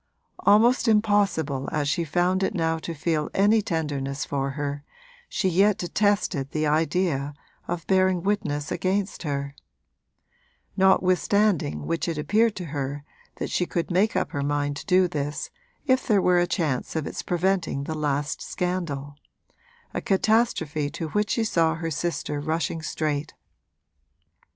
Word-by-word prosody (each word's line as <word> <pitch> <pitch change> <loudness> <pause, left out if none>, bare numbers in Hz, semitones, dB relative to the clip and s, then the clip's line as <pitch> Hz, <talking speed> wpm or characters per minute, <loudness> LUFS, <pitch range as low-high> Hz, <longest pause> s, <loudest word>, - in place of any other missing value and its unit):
Almost 230 +4 +4
impossible 205 -11 +2
as 150 -2 0
she 170 +3 +1
found 175 +4 +1
it 190 - 0
now 165 -2 0
to 165 +1 -6
feel 155 0 -1
any 210 +3 +4
tenderness 145 -6 -2
for 140 -1 -2
her, 145 0 -3 0.5
she 190 - 0
yet 195 +3 +3
detested 180 -6 0
the 155 +1 -1
idea 155 -2 0 0.3
of 175 -2 -3
bearing 185 -2 +2
witness 150 -8 -1
against 195 +1 -1
her: 140 -3 -3 1.2
notwithstanding 190 -2 +2
which 165 +1 -1
it 165 -2 -2
appeared 215 +8 +2
to 180 - -5
her 140 0 -3 0.3
that - - -4
she 180 - 0
could 170 +1 -2
make 195 +5 +2
up - - 0
her 140 - -2
mind 145 0 -1
to 140 - -9
do 185 0 +4
this 150 -3 -4 0.3
if 260 -2 +2
there 210 -5 +4
were 180 -1 +4
a 175 - +2
chance 155 -9 -1
of 160 -2 -1
its - - -4
preventing 180 -5 0
the 160 - -4
last 145 -1 -1
scandal 165 -6 -3 0.8
a - - -2
catastrophe 190 -8 +1
to 160 +2 -5
which 210 +4 0
she 230 - +1
saw 165 -6 +2
her 165 0 -4
sister 155 -2 -2
rushing 160 +1 -2
straight. 150 -1 -2
165 Hz, 145 wpm, -25 LUFS, 145-190 Hz, 1.2 s, Almost